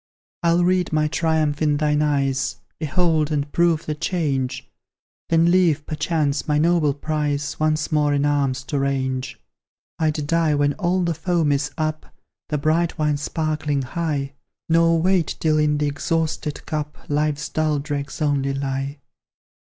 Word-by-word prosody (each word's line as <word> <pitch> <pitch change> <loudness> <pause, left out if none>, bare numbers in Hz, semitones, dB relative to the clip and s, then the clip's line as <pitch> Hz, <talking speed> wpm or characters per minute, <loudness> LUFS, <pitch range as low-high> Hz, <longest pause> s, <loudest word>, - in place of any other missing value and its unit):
I'll 170 0 +3
read 180 0 +2
my 155 -1 +2
triumph 155 -2 0
in 150 -2 +2
thine 150 0 +1
eyes, 135 -2 0 0.2
Behold, 160 -1 +1
and 145 -1 -1
prove 170 -2 +2
the 155 - -2
change; 140 -6 -2 0.6
Then 165 +1 +4
leave, 165 -5 +3
perchance, 150 -2 -1
my 150 -1 +2
noble 155 -2 +2
prize, 145 -1 -2
Once 155 0 0
more 150 -1 +2
in 145 0 +1
arms 140 -2 0
to 140 +1 -2
range. 130 -1 -2 0.6
I'd 155 -2 0
die 165 -1 +2
when 145 0 +2
all 185 +1 0
the 170 -1 0
foam 165 -2 0
is 140 +1 0
up, 155 0 -2 0.4
The 150 - 0
bright 160 +4 +1
wine 150 -2 +1
sparkling 150 -1 -1
high; 140 -1 -2 0.3
Nor 165 0 +4
wait 180 0 +1
till 155 -1 +2
in 150 -1 +2
the 150 - 0
exhausted 155 +1 -2
cup 150 -2 -4
Life's 150 0 0
dull 155 -1 0
dregs 145 0 -4
only 140 -2 0
lie. 135 +1 -3
150 Hz, 150 wpm, -22 LUFS, 145-160 Hz, 0.6 s, Then